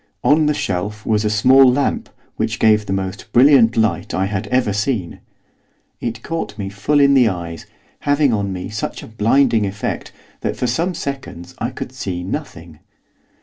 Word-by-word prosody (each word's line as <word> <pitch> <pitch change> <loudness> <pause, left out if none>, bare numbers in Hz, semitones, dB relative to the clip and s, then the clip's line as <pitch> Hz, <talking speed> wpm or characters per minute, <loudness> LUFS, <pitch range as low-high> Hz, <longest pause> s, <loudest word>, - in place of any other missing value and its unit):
On 150 +1 +4
the 150 - +1
shelf 105 +2 -3
was 110 -1 +1
a 105 - +1
small 130 +5 +6
lamp 140 +3 -1 0.3
which 115 +1 -2
gave 105 -2 +3
the - - -3
most 95 -1 -4
brilliant 125 -3 +5
light 95 -6 0
I 95 - +1
had 100 +1 -3
ever 120 -2 +1
seen. 105 -4 -2 0.8
It 115 -2 -5
caught 165 -10 -4
me 100 -2 -4
full 105 +9 0
in 140 0 +5
the 130 -4 +5
eyes, 85 -3 -6 0.3
having 145 -2 +2
on 100 -2 -1
me 90 -1 -5
such 105 -1 -5
a - - -10
blinding 115 0 +2
effect 100 +1 -4 0.3
that - - -3
for - - -1
some 165 +9 -1
seconds 130 - -6
I 120 - -1
could 125 - -7
see 95 -9 -5
nothing. 85 - -7
110 Hz, 175 wpm, -19 LUFS, 95-130 Hz, 0.8 s, small